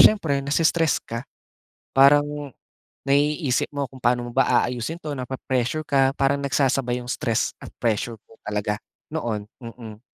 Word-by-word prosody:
siyempre 160 -10 +5
nai-stress 160 +3 +2
ka. 115 0 -4 0.7
Parang, 140 +2 +7 0.8
naiisip 145 0 +2
mo 140 -2 -2
kung 130 - -13
paano 120 0 +1
mo - - -8
ba 135 -1 +4
aayusin 125 +8 -3
ito 155 - -6
napre-pressure 130 +2 -2
ka, 135 -1 +4
parang 140 0 +2
nagsasabay 135 -3 +1
iyong 125 - -9
stress 115 -3 0
at - - -11
pressure 115 +1 0 0.2
ko 110 - -18
talaga 105 0 -1 0.3
noon. 110 -9 -3
Mm. 115 -3 -10
135 Hz, 140 wpm, -24 LUFS, 120-140 Hz, 0.8 s, Parang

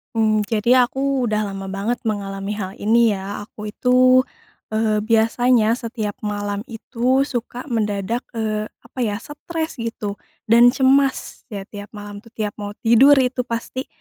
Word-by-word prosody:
Mmm, 215 -1 +2
jadi 235 +4 +3
aku 270 +1 -1
udah 215 -3 0
lama 195 -1 -6
banget 200 +5 -1
mengalami 200 -2 -3
hal 190 -1 -5
ini 225 0 +3
ya, 200 +2 -6
aku 210 -1 -8
itu, 255 +2 +4 0.5
eee, 215 -1 +1
biasanya 225 +1 +3
setiap 230 -3 -3
malam 205 +1 -3
itu 245 +3 0
suka 245 -2 -5
mendadak, 210 0 -1 0.2
eee, 215 -1 -2 0.2
apa 235 +2 -11
ya 220 -4 0
stres 320 0 -5
gitu 220 -3 -4 0.3
dan 235 +1 +8
cemas 265 +2 +2
ya 200 -4 -6
tiap 205 +1 -9
malam 205 0 -8
tuh, 225 - -19
tiap 210 -2 -2
mau 205 0 -6
tidur 240 +5 +7
itu 255 -1 +1
pasti 235 +3 -4
225 Hz, 150 wpm, -21 LUFS, 205-250 Hz, 0.5 s, dan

